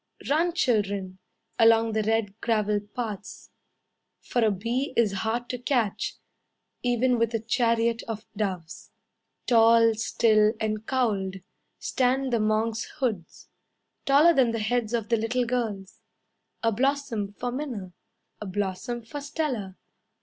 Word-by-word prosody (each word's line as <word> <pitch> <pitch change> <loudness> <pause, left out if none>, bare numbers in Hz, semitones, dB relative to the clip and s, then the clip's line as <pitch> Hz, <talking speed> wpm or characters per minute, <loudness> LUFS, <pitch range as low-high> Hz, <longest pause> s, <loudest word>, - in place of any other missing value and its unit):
Run, 335 +4 +2
children, 200 - 0 0.4
Along 225 0 +5
the 220 0 +1
red 220 -1 0
gravel 210 -2 +1
paths, 210 -1 -7 0.7
For 240 - -1
a 220 - +4
bee 230 +8 -2
is 230 -4 +4
hard 225 +5 -2
to 250 - -3
catch, 240 -5 -1 0.7
Even 245 0 +2
with 230 0 +1
a - - +1
chariot 230 0 +1
of 220 -1 -5
doves. 185 -5 -4 0.6
Tall, 230 -1 +5
still, 215 -1 +3
and 215 0 -2
cowled, 210 -8 0 0.4
Stand 260 0 0
the 235 - +3
monk's 215 +1 0
hoods; 220 - -3 0.6
Taller 295 +5 +6
than 250 -6 +3
the - - -1
heads 230 +1 0
of 225 -2 -3
the 230 - +3
little 240 +3 0
girls. 220 -6 -3 0.6
A 230 - +3
blossom 245 -4 -1
for 245 +4 -4
Minna. 240 -9 -5 0.5
A 210 - -5
blossom 195 +5 -3
for 285 +6 -7
Stella. 270 - -3
225 Hz, 130 wpm, -26 LUFS, 210-245 Hz, 0.7 s, Taller